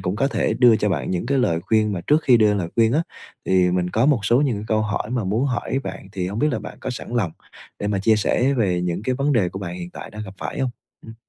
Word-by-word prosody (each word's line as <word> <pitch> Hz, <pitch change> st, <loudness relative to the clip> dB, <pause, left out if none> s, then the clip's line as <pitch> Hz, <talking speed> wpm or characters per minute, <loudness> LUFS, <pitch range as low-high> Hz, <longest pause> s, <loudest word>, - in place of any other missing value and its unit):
cũng 90 Hz, +2 st, -2 dB
có 135 Hz, +5 st, +1 dB
thể -, -, 0 dB
đưa 120 Hz, -3 st, +6 dB
cho 105 Hz, -, 0 dB
bạn 85 Hz, -4 st, -1 dB
những 90 Hz, +5 st, -2 dB
cái 140 Hz, 0 st, +1 dB
lời 85 Hz, -10 st, +1 dB
khuyên, 105 Hz, +2 st, +1 dB
mà 90 Hz, -, -3 dB
trước 150 Hz, +2 st, +3 dB
khi 125 Hz, -, +5 dB
đưa 105 Hz, -2 st, +4 dB
lời 90 Hz, -4 st, -2 dB
khuyên 115 Hz, 0 st, +4 dB
á 155 Hz, -, +2 dB, 0.4 s
thì 90 Hz, -1 st, +3 dB
mình 90 Hz, 0 st, 0 dB
có 115 Hz, +7 st, +2 dB
một 140 Hz, -7 st, +3 dB
số 120 Hz, +6 st, +3 dB
những 130 Hz, -7 st, +1 dB
cái 105 Hz, -, -6 dB
câu 110 Hz, 0 st, +2 dB
hỏi 105 Hz, +1 st, -2 dB
mà 125 Hz, -4 st, -1 dB
muốn 110 Hz, +8 st, 0 dB
hỏi 130 Hz, +1 st, -1 dB
bạn, 95 Hz, 0 st, -7 dB
thì 90 Hz, -2 st, -3 dB
hông 100 Hz, +3 st, -4 dB
biết 150 Hz, -, +2 dB
là -, -, -1 dB
bạn -, -, -9 dB
có -, -, -4 dB
sẵn 125 Hz, -, -7 dB
lòng 90 Hz, -8 st, 0 dB, 0.5 s
để 100 Hz, -, -3 dB
mà 100 Hz, -2 st, 0 dB
chia 110 Hz, +2 st, +3 dB
sẻ 130 Hz, +6 st, +1 dB
về 95 Hz, -7 st, +1 dB
những 90 Hz, +2 st, -2 dB
cái 130 Hz, +3 st, 0 dB
vấn 140 Hz, +2 st, 0 dB
đề 100 Hz, -8 st, +2 dB
của 95 Hz, -, -7 dB
bạn 90 Hz, -2 st, -5 dB
hiện 90 Hz, 0 st, -7 dB
tại -, -, -9 dB
đang 105 Hz, 0 st, -7 dB
gặp 95 Hz, -1 st, -10 dB
phải -, -, -5 dB
hông? 130 Hz, -2 st, 0 dB, 0.4 s
Ừm. 110 Hz, -, -10 dB
105 Hz, 300 wpm, -22 LUFS, 95-125 Hz, 0.5 s, đưa